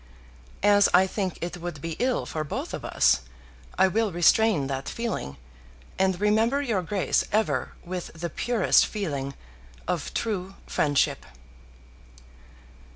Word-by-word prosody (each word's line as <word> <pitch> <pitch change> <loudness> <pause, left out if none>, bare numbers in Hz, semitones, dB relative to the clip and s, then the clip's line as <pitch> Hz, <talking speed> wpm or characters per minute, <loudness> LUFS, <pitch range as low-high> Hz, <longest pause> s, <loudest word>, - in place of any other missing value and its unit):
As 205 -1 +5
I 185 +1 +6
think 190 -2 -3
it 175 +1 -4
would 175 -3 -6
be 165 +2 -5
ill 255 0 0
for 155 - -3
both 145 - -5
of - - -5
us, 65 - +3 0.6
I - - +5
will 215 +2 0
restrain 175 -1 +4
that 135 0 -4
feeling, 230 - -4 0.6
and 190 -2 +2
remember 220 +6 +2
your 235 -9 0
Grace 190 +2 0
ever 215 +1 0
with 180 0 -4
the 170 0 -5
purest 235 +1 +3
feeling 140 - -4 0.5
of - - -2
true 195 -4 -2
friendship. 145 -2 +1
190 Hz, 130 wpm, -26 LUFS, 165-215 Hz, 0.6 s, I